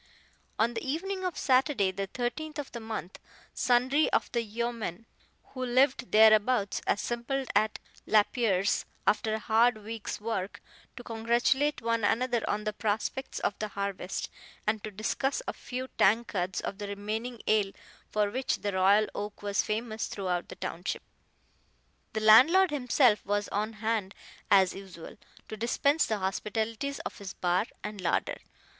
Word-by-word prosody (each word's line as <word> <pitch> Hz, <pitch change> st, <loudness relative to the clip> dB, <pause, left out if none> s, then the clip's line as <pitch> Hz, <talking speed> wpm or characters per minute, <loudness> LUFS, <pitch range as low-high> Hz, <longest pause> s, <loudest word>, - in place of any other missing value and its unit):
On 230 Hz, +2 st, +2 dB
the 225 Hz, -, -4 dB
evening 375 Hz, +7 st, -3 dB
of 365 Hz, -3 st, -2 dB
Saturday, 255 Hz, -7 st, +2 dB
the 195 Hz, +1 st, -4 dB
13th 300 Hz, +8 st, -4 dB
of 290 Hz, -2 st, -5 dB
the 235 Hz, -, -6 dB
month, 220 Hz, -4 st, -6 dB, 0.3 s
sundry 255 Hz, +5 st, +2 dB
of -, -, +1 dB
the 235 Hz, -, +1 dB
yeomen 230 Hz, -2 st, -4 dB, 0.5 s
who 255 Hz, -1 st, -4 dB
lived 250 Hz, 0 st, +2 dB
thereabouts 215 Hz, 0 st, +5 dB
assembled 240 Hz, +5 st, -1 dB
at 215 Hz, 0 st, +2 dB, 0.3 s
Lapierre's, 210 Hz, -2 st, +2 dB, 0.2 s
after 215 Hz, +1 st, +2 dB
a -, -, -1 dB
hard 225 Hz, +1 st, +3 dB
week's 225 Hz, -1 st, -5 dB
work, 210 Hz, -3 st, -3 dB, 0.4 s
to 245 Hz, -, -9 dB
congratulate 240 Hz, +5 st, +1 dB
one 230 Hz, -1 st, 0 dB
another 235 Hz, +3 st, +1 dB
on 210 Hz, +1 st, -1 dB
the 215 Hz, 0 st, -2 dB
prospects 220 Hz, +5 st, -2 dB
of -, -, +1 dB
the 215 Hz, -, -2 dB
harvest, 200 Hz, -2 st, -4 dB, 0.4 s
and 215 Hz, 0 st, 0 dB
to 215 Hz, -, -4 dB
discuss 250 Hz, -, -1 dB
a -, -, -2 dB
few 255 Hz, +1 st, -6 dB
tankards 195 Hz, -3 st, +2 dB
of 195 Hz, -, -5 dB
the 205 Hz, -, -4 dB
reaming 215 Hz, +4 st, -4 dB
ale 210 Hz, -2 st, +2 dB, 0.4 s
for 210 Hz, -1 st, +1 dB
which 260 Hz, +3 st, -1 dB
the 205 Hz, -, -1 dB
Royal 195 Hz, +3 st, +4 dB
Oak 205 Hz, 0 st, -6 dB
was 200 Hz, -1 st, +1 dB
famous 220 Hz, +1 st, -3 dB
throughout 180 Hz, -3 st, -3 dB
the -, -, -8 dB
township. 175 Hz, +3 st, -4 dB, 1.1 s
The 220 Hz, -, -1 dB
landlord 295 Hz, -, +7 dB
himself 250 Hz, -5 st, +3 dB
was 205 Hz, +1 st, -1 dB
on 215 Hz, +2 st, -2 dB
hand 215 Hz, -2 st, -2 dB, 0.3 s
as 190 Hz, -2 st, +5 dB
usual, 185 Hz, -4 st, -10 dB, 0.3 s
to -, -, -6 dB
dispense 280 Hz, +7 st, +2 dB
the 215 Hz, -, 0 dB
hospitalities 220 Hz, +7 st, -2 dB
of -, -, -7 dB
his 200 Hz, -2 st, -7 dB
bar 180 Hz, +4 st, +1 dB, 0.2 s
and 210 Hz, -2 st, -5 dB
larder. 175 Hz, -, 0 dB
220 Hz, 150 wpm, -29 LUFS, 205-245 Hz, 1.1 s, landlord